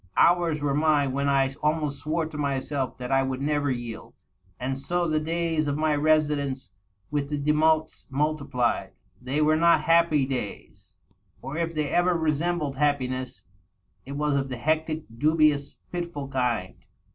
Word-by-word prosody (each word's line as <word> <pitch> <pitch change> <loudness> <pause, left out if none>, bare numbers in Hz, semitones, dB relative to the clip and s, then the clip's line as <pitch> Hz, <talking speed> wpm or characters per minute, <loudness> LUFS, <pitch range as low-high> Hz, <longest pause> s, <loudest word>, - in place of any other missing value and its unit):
Hours 170 -4 +3
were 140 -1 +1
mine 145 -2 +2
when 140 +1 0
I 135 -1 +2
almost 150 -2 0
swore 160 +2 -1
to 155 0 -9
myself 140 -1 -2
that 125 0 -6
I 135 0 +4
would 130 -1 -2
never 145 0 0
yield... 120 -3 -5 0.4
And 130 +1 -3
so 175 +4 -1
the 155 -1 +1
days 165 -1 -1
of 145 0 -1
my 155 -1 +2
residence 145 -4 +1 0.4
with 145 -1 -1
the 150 - -1
Demottes 155 +2 +1
multiplied. 140 -3 -1 0.3
They 135 +4 0
were 155 +1 +4
not 170 -1 +4
happy 165 -3 +3
days, 125 -6 -6 0.4
or, 135 +3 -7
if 165 0 -2
they 150 -2 -1
ever 175 +3 +2
resembled 155 -2 -1
happiness, 130 -3 -1 0.6
it 135 - -8
was 145 0 0
of 135 -1 -1
the 125 - -4
hectic, 155 +3 -1
dubious, 150 -2 +2 0.2
fitful 170 -6 -4
kind. 125 -8 -2
150 Hz, 155 wpm, -26 LUFS, 135-155 Hz, 0.6 s, I